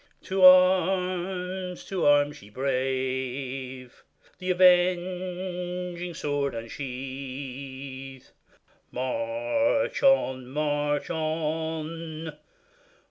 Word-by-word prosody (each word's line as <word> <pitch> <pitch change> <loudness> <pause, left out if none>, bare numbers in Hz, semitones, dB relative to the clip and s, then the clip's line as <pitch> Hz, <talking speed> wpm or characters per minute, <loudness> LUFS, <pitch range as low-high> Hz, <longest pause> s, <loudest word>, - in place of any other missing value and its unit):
To 190 0 -2
arms! 185 0 +4
to 185 -6 0
arms! 145 0 +3
ye 100 - -14
brave! 130 0 -3 0.4
The 185 - -4
avenging 180 -1 +1
sword 145 -3 -1
unsheathe; 130 +2 -7 0.6
March 285 - 0
on! 130 - +3
march 145 +1 -1
on 160 0 -3
155 Hz, 65 wpm, -27 LUFS, 135-180 Hz, 0.6 s, arms